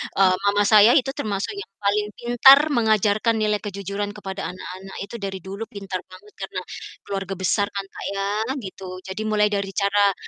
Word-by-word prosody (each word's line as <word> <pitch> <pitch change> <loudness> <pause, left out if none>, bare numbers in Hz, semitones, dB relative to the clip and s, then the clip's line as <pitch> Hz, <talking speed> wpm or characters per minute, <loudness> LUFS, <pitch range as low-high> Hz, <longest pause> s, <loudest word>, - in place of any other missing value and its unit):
eee, 185 -1 +5
mama 205 0 +3
saya 215 +2 +7
itu 270 0 +3
termasuk 205 - -2
yang 400 - -8
paling 210 +1 +1
pintar 245 +3 +7
mengajarkan 220 -2 +2
nilai 210 -1 +2
kejujuran 200 0 -4
kepada 195 -2 -6
anak-anak, 185 +1 -9
itu 200 +4 -7
dari 195 -2 -5
dulu 195 +4 -6
pintar 195 -4 -6
banget 185 +3 -16
karena 190 -1 -5 0.4
keluarga 195 -1 -4
besar 190 +2 +1
kan 200 -1 -3
Kak - - -9
ya, 195 0 -2 0.3
gitu. 185 -2 -8
Jadi 190 +3 -6
mulai 210 -1 +2
dari 200 -1 -2
cara 200 0 +3
200 Hz, 170 wpm, -23 LUFS, 195-210 Hz, 0.4 s, saya